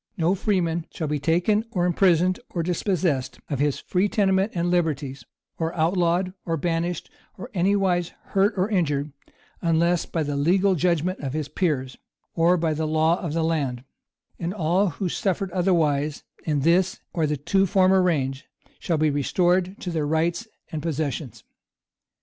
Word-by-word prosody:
No 170 +1 +2
freeman 175 -5 0
shall 160 - -4
be 150 0 -1
taken 175 +9 +2
or 180 -6 0
imprisoned, 180 +1 +3
or 170 - -2
dispossessed 160 - -1
of 140 - -1
his 145 -1 +1
free 190 +3 0
tenement 195 0 +2
and 175 0 0
liberties, 145 -7 -1 0.4
or 165 0 -2
outlawed, 175 +2 +1
or 165 -1 -1
banished, 170 +1 -2 0.3
or - - -8
anywise 185 -2 +1 0.2
hurt 200 +3 +3
or 185 +2 +2
injured, 150 -8 0 0.5
unless 170 +1 +2
by 165 - -1
the 145 -1 -3
legal 185 +7 +3
judgment 175 +1 0
of 135 -2 -4
his 155 -2 -2
peers, 140 -9 -1 0.4
or 170 +2 +3
by 160 -2 0
the 155 +1 -2
law 160 +2 +2
of 165 -5 -3
the 165 0 0
land; 140 -7 -1 0.6
and 175 +3 -3
all 180 +2 +2
who 180 +4 -3
suffered 190 +1 -1
otherwise 155 -5 +1 0.2
in 150 -3 0
this 180 - +2
or 160 -3 +1
the 150 0 -1
two 195 +8 +1
former 190 0 +4
reigns, 140 -7 0 0.4
shall 165 - -1
be 155 0 +2
restored 180 +6 +1
to 180 - -4
their 155 -3 -1
rights 170 +7 0 0.2
and 155 - -3
possessions. 145 - -3
170 Hz, 160 wpm, -24 LUFS, 155-185 Hz, 0.6 s, former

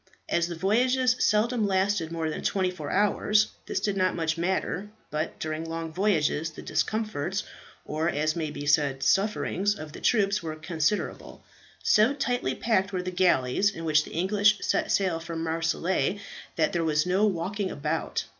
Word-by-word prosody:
As 170 0 +1
the 170 - -5
voyages 250 +7 +2
seldom 215 +1 +2
lasted 190 -3 +1
more 165 -1 -2
than - - -5
twenty 185 -2 0
four 155 -5 -7
hours, 210 +1 +2 0.2
this - - -1
did 205 -2 -1
not 185 -1 +1
much 160 -2 0
matter, 185 +3 -2 0.2
but 155 +1 -3
during 155 0 -3
long 165 0 -5
voyages 165 -5 +1
the - - -11
discomforts, 210 -4 -1 0.4
or 155 +2 -1
as 155 0 0
may 160 -3 -2
be 145 -1 -6
said 145 -2 +2
sufferings, 200 +4 +1
of 155 -3 -8
the - - -9
troops 205 -2 +2
were 160 -2 -5
considerable. 160 +4 -2 0.4
So 220 +7 +4
tightly 245 - -1
packed 200 -4 +1
were 185 -2 -2
the 185 - -3
galleys 180 -1 +2
in 165 -4 -7
which 155 -1 +3
the - - -11
English 205 +4 +3
set - - 0
sail 185 -4 +1
from 165 0 -5
Marseilles, 165 +4 0 0.4
that 155 -2 +1
there 170 - 0
was 155 -1 +1
no 190 +4 +3
walking 195 +2 -2
about. 155 +1 -2
180 Hz, 170 wpm, -27 LUFS, 160-205 Hz, 0.4 s, So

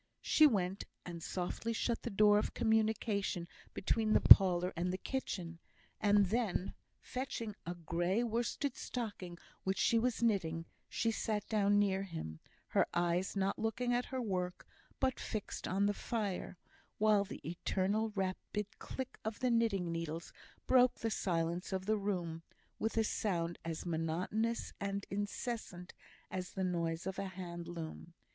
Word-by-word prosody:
She 310 - +7
went 195 -6 0 0.2
and 170 -2 -6
softly 185 +7 -2
shut 230 +1 0
the - - -3
door 210 0 +5
of - - -3
communication 220 -5 +1 0.3
between 215 +2 +1
the - - +6
parlour 180 -1 +8
and 180 +2 0
the 185 - -2
kitchen; 180 -9 -4 0.4
and 205 -1 +5
then, 205 -2 0 0.3
fetching 245 -5 -4
a 175 - -2
grey 175 +6 0
worsted 240 +4 -1
stocking 205 -8 -5 0.3
which 190 0 0
she 230 +3 +4
was 235 0 0
knitting, 165 -7 +1 0.2
sat 220 -2 -1
down 205 -2 +3
near 195 -2 +3
him, 160 - -6 0.3
her - - +3
eyes 175 +3 +1
not 195 0 0
looking 230 +3 0
at 245 +1 +1
her 260 - -4
work 180 -6 -2 0.3
but 260 -1 +1
fixed 215 -3 -4
on 195 +2 +2
the 205 - +2
fire; 205 -4 -3 0.4
while 210 -1 +4
the 190 - -8
eternal 195 +5 0
rapid 195 +2 -2
click 260 -1 -6
of 220 0 -3
the 255 -1 +2
knitting 210 -7 +2
needles 165 0 -4 0.3
broke 255 -1 +5
the 225 - -2
silence 170 -1 -1
of 190 -1 -2
the 215 +1 +2
room, 175 -5 -2 0.4
with 220 +1 -1
a 225 - +5
sound 175 -6 -1
as 165 0 -4
monotonous 175 +8 -1
and 200 0 -2
incessant 205 -2 -4 0.4
as 185 -1 -4
the 190 - -2
noise 170 -2 -1
of 190 0 -3
a 195 - -2
hand 175 -2 -6
loom. 170 0 -7
195 Hz, 150 wpm, -35 LUFS, 175-220 Hz, 0.4 s, parlour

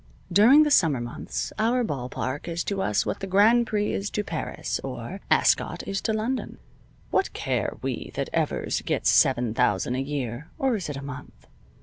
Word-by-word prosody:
During 245 - +7
the 300 - 0
summer 160 - +4
months 120 0 -5
our 240 +3 +2
ball 135 - -3
park 130 +5 -4
is 170 0 -2
to 200 -1 -2
us 105 - +1
what - - -3
the 195 - -5
Grand 220 +5 +4
Prix 210 -1 0
is 200 +1 -2
to 210 - -2
Paris, - - -3
or - - -6
Ascot - - +2
is 195 0 -2
to 225 - 0
London. 225 +4 -2 0.5
What 385 - +1
care - - -2
we - - -3
that - - -3
Evers - - -1
gets - - +1
seven 120 -4 +3
thousand 115 -1 +1
a 130 - -1
year 135 0 -4
(or 265 -3 +1
is 185 -7 -4
it 145 - -4
a 140 - -7
month?) 140 -2 -9
175 Hz, 190 wpm, -25 LUFS, -, 0.5 s, During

